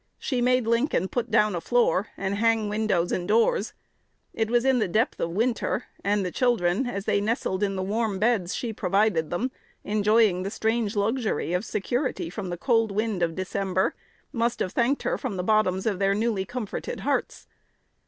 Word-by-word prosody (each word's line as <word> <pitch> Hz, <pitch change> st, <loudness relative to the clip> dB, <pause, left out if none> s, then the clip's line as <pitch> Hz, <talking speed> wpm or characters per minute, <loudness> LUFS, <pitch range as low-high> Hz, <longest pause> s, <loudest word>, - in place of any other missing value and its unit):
She 255 Hz, -4 st, -2 dB
made 250 Hz, -1 st, +3 dB
Lincoln 230 Hz, -, +1 dB
put 240 Hz, -2 st, -2 dB
down 215 Hz, -2 st, +3 dB
a 170 Hz, -, -3 dB
floor, 220 Hz, -1 st, +2 dB
and 195 Hz, 0 st, -2 dB
hang 225 Hz, 0 st, +2 dB
windows 205 Hz, -5 st, 0 dB
and 175 Hz, -1 st, -2 dB
doors. 230 Hz, -, +2 dB, 0.6 s
It 225 Hz, -1 st, -1 dB
was 240 Hz, +1 st, +2 dB
in 265 Hz, -2 st, +3 dB
the 215 Hz, -, +1 dB
depth 220 Hz, +9 st, 0 dB
of 170 Hz, -, -1 dB
winter; 230 Hz, +5 st, 0 dB, 0.2 s
and 200 Hz, -1 st, +1 dB
the 180 Hz, -, -3 dB
children, 240 Hz, -1 st, +1 dB
as 200 Hz, -4 st, -4 dB
they 200 Hz, -, +2 dB
nestled 205 Hz, -3 st, -1 dB
in 200 Hz, -1 st, 0 dB
the 190 Hz, -, -2 dB
warm 210 Hz, +1 st, -1 dB
beds 205 Hz, -4 st, +1 dB
she 230 Hz, -3 st, -3 dB
provided 195 Hz, -4 st, +1 dB
them, 240 Hz, +9 st, -2 dB, 0.3 s
enjoying 210 Hz, -2 st, +3 dB
the 190 Hz, -, -3 dB
strange 220 Hz, 0 st, -1 dB
luxury 215 Hz, -4 st, 0 dB
of 180 Hz, +2 st, 0 dB
security 240 Hz, -, -2 dB
from 195 Hz, -1 st, -5 dB
the 175 Hz, -, -4 dB
cold 225 Hz, 0 st, +2 dB
winds 210 Hz, -3 st, -1 dB
of 165 Hz, -1 st, -1 dB
December, 190 Hz, 0 st, -1 dB, 0.4 s
must 235 Hz, 0 st, 0 dB
have 185 Hz, -, -2 dB
thanked 255 Hz, +3 st, +1 dB
her -, -, -1 dB
from 230 Hz, -8 st, -4 dB
the 180 Hz, -, -2 dB
bottoms 190 Hz, -2 st, +2 dB
of 205 Hz, -4 st, 0 dB
their 195 Hz, 0 st, +2 dB
newly 215 Hz, -3 st, 0 dB
comforted 245 Hz, -3 st, -5 dB
hearts. -, -, -2 dB
215 Hz, 185 wpm, -26 LUFS, 190-235 Hz, 0.6 s, made